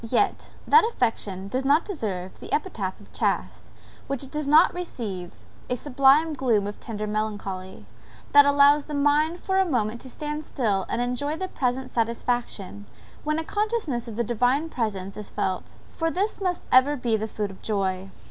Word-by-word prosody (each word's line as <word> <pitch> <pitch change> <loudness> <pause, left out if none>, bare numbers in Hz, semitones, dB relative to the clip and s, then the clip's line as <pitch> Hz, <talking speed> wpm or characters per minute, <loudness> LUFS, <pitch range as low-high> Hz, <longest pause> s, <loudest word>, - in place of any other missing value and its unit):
Yet, 250 - 0 0.2
that 455 - +7
affection 225 - -1
does 255 +6 -2
not 285 +4 +3
deserve 195 - -4
the - - -10
epithet 220 - -2
of 205 - -18
chaste - - -2 0.4
which 275 0 -3
does 300 -1 -3
not 310 +4 +6
receive 215 - -5 0.4
a 250 - +1
sublime 280 +4 +4
gloom 235 -8 +1
of 205 0 -6
tender 215 -2 -5
melancholy, 205 -3 -4 0.5
that 285 0 +9
allows 285 +1 +5
the 300 - -5
mind 300 +4 +2
for 380 +1 0
a - - +5
moment 235 - -1
to 260 - -10
stand 300 +3 -5
still 210 -10 -1
and 235 - -1
enjoy 285 +5 -2
the 375 - -3
present 255 0 -2
satisfaction, 230 -4 -1 0.4
when 305 +1 0
a 320 - -1
consciousness 415 - -1
of 225 - -7
the 235 - 0
Divine 250 +7 +1
presence 200 -8 -3
is 210 - -7
felt 185 -1 -3 0.2
for 325 0 -1
this 395 +5 -2
must 365 -2 -1
ever 260 +3 +6
be 240 -4 0
the 220 0 -2
food 210 -2 -3
of 190 - -14
joy! 195 -2 -1
250 Hz, 175 wpm, -25 LUFS, 210-300 Hz, 0.5 s, that